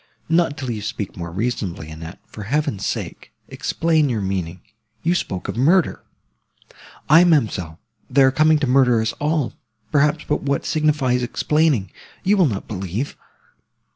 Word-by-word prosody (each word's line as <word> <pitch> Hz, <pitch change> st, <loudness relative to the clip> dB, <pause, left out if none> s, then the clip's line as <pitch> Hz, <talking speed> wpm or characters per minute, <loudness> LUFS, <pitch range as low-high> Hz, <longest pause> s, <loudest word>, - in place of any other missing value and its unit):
"Not 165 Hz, -3 st, +2 dB
till 130 Hz, -3 st, -4 dB
you 110 Hz, -2 st, -4 dB
speak 105 Hz, -1 st, -5 dB
more 85 Hz, -1 st, -6 dB
reasonably, 95 Hz, -6 st, -3 dB
Annette; 80 Hz, +3 st, -9 dB
for 105 Hz, -, -9 dB
Heaven's 115 Hz, -6 st, -1 dB
sake, -, -, -5 dB, 0.2 s
explain 160 Hz, -3 st, 0 dB
your 115 Hz, -3 st, -1 dB
meaning. 95 Hz, -3 st, -3 dB, 0.4 s
You 170 Hz, -, +2 dB
spoke 95 Hz, -, -3 dB
of 100 Hz, -, -4 dB
murder!" 165 Hz, +9 st, +2 dB, 1.1 s
"Aye, 165 Hz, +4 st, +7 dB
ma'amselle, 110 Hz, -, +1 dB, 0.3 s
they 135 Hz, +1 st, +4 dB
are 130 Hz, -, +5 dB
coming 155 Hz, +3 st, +4 dB
to 150 Hz, -, 0 dB
murder 125 Hz, -2 st, +4 dB
us 110 Hz, 0 st, -1 dB
all, 150 Hz, -2 st, 0 dB, 0.4 s
perhaps; 150 Hz, +1 st, +2 dB
but 150 Hz, -, 0 dB
what 140 Hz, -1 st, -1 dB
signifies 150 Hz, -5 st, +1 dB
explaining?—you 150 Hz, -, 0 dB
will 185 Hz, -5 st, +4 dB
not 100 Hz, -6 st, -4 dB
believe." 100 Hz, +6 st, -4 dB
130 Hz, 145 wpm, -21 LUFS, 100-150 Hz, 1.1 s, Aye